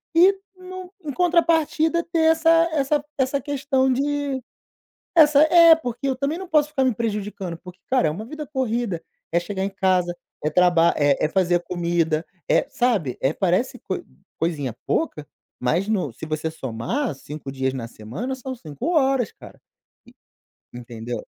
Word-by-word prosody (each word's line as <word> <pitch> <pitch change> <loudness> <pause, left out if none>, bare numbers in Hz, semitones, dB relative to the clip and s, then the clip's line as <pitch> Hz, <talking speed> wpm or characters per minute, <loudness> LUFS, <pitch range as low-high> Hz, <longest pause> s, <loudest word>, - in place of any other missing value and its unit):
e 370 +4 +6 0.2
nu 370 0 -9
em 285 - -3
contrapartida, 335 -1 +2
ter 335 -1 -2
essa 325 0 +2 0.2
essa 290 0 +1
essa 265 +1 +1
questão 270 -1 0
de 280 0 -1 0.7
essa 300 -3 +7
É, 335 0 +8
porque 250 -3 -4
eu 265 - +1
também 280 +5 -2
não 380 +1 -7
posso 300 -3 +3
ficar 275 -3 +1
me 255 - +2
prejudicando, 205 -5 -3
porque, 180 +1 -13
cara, 255 -11 +3
é - - +1
uma 210 +8 -6
vida 305 +3 -7
corrida, 235 - -2 0.3
é 170 - +3
chegar 190 +1 -4
em 195 - -1
casa, 185 -3 +1 0.3
é 150 - +1
traba 170 0 +4
é 145 0 +2
é - - 0
fazer 175 -2 +2
comida, 170 -2 0 0.2
é - - +3
sabe? 205 - 0
É, 135 - +2
parece 200 +9 0
coi-coisinha 165 -7 -4
pouca, 155 - -1 0.3
mas 165 +11 0
no 185 - 0
se 160 - -8
você 155 +1 -2
somar, 150 - -3
5 145 0 -8
dias 130 -1 -1
na 120 -3 -5
semana, 125 - -6
são 260 0 -6
5 160 - -5
horas, 270 -6 +2
cara. - - -14 0.5
E - - -17 0.6
entendeu? 120 0 -6
230 Hz, 160 wpm, -23 LUFS, -, 0.7 s, É